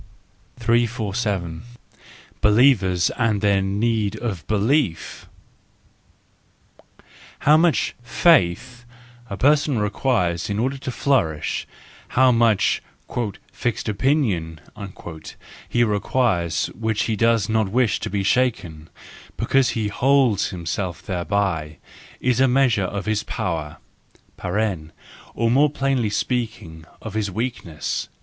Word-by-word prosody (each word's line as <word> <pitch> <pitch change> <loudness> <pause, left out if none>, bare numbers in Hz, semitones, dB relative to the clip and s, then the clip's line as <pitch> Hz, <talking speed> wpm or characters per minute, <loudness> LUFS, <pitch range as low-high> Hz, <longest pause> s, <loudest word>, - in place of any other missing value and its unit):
347. 110 -7 -1 0.8
Believers 105 -6 +4
and 115 -4 +2
their 100 -1 +2
Need 105 +1 0
of 100 -9 -5
Belief 110 - 0 2.1
—How 150 - +5
much 165 0 +2
faith 120 - +2 0.5
a 100 - -5
person 145 0 +3
requires 105 -5 0
in 100 - -2
order 130 +5 -1
to 130 - -5
flourish, 120 - 0 0.5
how 130 0 +6
much 115 -3 +2 0.4
" 120 - +1 0.3
fixed 120 -1 -2
opinion 105 - 0 0.5
" 80 -2 -13
he 120 - +2
requires 105 -5 0
which 110 -1 -1
he 110 - -1
does 115 -2 +2
not 110 -2 +1
wish 120 +1 +1
to - - -4
have 100 0 -2
shaken, 90 -11 0 0.5
because 135 -2 +2
he 115 -2 -1
holds 130 -3 +2
himself 90 0 -4
thereby—is 95 - -3
a 135 - +5
measure 125 -6 +2
of 100 +2 -4
his 110 -1 0
power 80 -8 -4 1.6
(or 115 0 +1
more 145 +4 +4
plainly 135 -5 0
speaking, 105 -7 -3 0.2
of 110 - -6
his 110 -2 -1
weakness). 105 -6 -4
110 Hz, 105 wpm, -22 LUFS, 95-125 Hz, 2.1 s, how